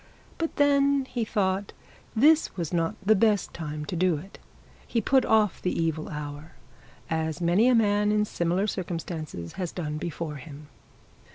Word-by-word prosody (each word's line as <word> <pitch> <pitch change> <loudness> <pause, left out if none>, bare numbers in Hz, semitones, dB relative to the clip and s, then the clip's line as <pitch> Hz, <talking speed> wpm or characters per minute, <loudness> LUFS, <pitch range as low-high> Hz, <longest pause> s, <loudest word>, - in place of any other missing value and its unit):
But 330 -1 -2
then 280 -1 +3
he 245 -3 -3
thought 200 -2 -1 0.4
this 300 +1 +4
was 170 -1 -3
not 165 -1 0
the 215 - +6
best 210 -1 +2
time 150 -2 -5
to 175 - -4
do 175 -2 +2
it. 190 +7 -11 0.5
He 235 - 0
put 260 +4 +3
off 215 -4 +2
the 180 - -1
evil 160 -1 -1
hour, 150 +1 -7 0.6
as 160 0 -1
many 180 +7 +3
a 255 - +5
man 210 -2 +3
in 210 0 +2
similar 175 0 0
circumstances 165 - -5
has 180 - -2
done 155 -4 -4
before 160 -2 -4
him. 145 +1 -11
180 Hz, 160 wpm, -27 LUFS, 160-215 Hz, 0.6 s, the